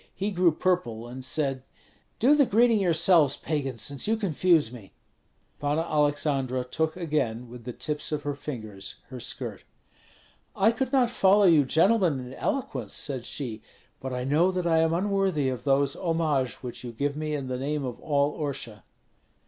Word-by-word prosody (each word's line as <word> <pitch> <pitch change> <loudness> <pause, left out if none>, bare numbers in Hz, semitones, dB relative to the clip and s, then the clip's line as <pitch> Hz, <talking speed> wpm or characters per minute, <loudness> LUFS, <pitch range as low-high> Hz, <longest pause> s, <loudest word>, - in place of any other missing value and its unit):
He 200 +2 -2
grew 180 -2 +3
purple, 155 -10 -1
and 130 +2 -8
said, 135 -1 -1 0.6
"Do 260 +6 +5
the 290 -3 +4
greeting 230 +1 +4
yourselves, 170 -5 +4
pagans, 135 -6 -3
since 140 +3 -2
you 225 +1 +2
confuse 170 - +2
me." 115 -6 -12 0.7
Panna 145 +3 0
Aleksandra 145 -4 0
took 160 +6 -2
again, 140 -9 -1
with 120 0 -11
the 125 - -4
tips 150 +6 -3
of 150 -1 -2
her 145 0 -2
fingers, 110 -9 -7
her 130 - -7
skirt. - - -5 0.9
"I 210 +4 +4
could 255 +2 -2
not 255 -4 +3
follow 200 -2 +4
you 160 -6 +6
gentlemen 170 - +3
in 125 0 -8
eloquence," 140 - -3
said 130 -4 -3
she, 115 -6 -5 0.4
"but 130 - -5
I 125 0 -3
know 150 +7 +3
that 185 -1 -2
I 165 -1 +3
am 160 0 +3
unworthy 190 -6 +1
of 130 +1 -5
those 140 0 +2
homages 160 -8 -1
which 125 0 -6
you 120 -1 -6
give 140 +4 -1
me 155 0 -2
in 140 -2 -4
the 125 -1 -3
name 145 +1 -2
of 125 -2 -5
all 145 -1 +1
Orsha." 130 - -5
150 Hz, 175 wpm, -27 LUFS, 130-175 Hz, 0.9 s, you